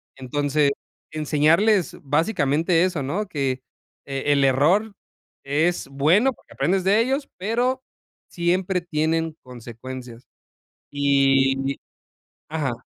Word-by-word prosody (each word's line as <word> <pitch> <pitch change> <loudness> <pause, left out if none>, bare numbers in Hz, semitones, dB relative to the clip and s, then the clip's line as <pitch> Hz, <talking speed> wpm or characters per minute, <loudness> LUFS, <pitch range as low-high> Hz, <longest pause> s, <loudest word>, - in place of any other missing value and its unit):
Entonces, 145 +2 0 0.4
enseñarles 165 +5 +2
básicamente 160 +1 +1
eso, 165 -7 -2
¿no? 190 +10 -2
Qué, 135 -6 -2 0.4
e 135 +1 -2
el 140 -1 +2
error 175 +12 +2 0.5
es 155 +5 0
bueno 170 - +3
porque - - -20
aprendes 180 +7 0
de 205 +3 +4
ellos, 270 +4 -1
pero 245 +7 -1 0.5
siempre 180 +1 0
tienen 160 -1 -1
consecuencias. 125 0 -10 0.7
Y 135 -1 +2 0.7
ajá. 150 -5 -2
150 Hz, 100 wpm, -23 LUFS, 135-180 Hz, 0.7 s, de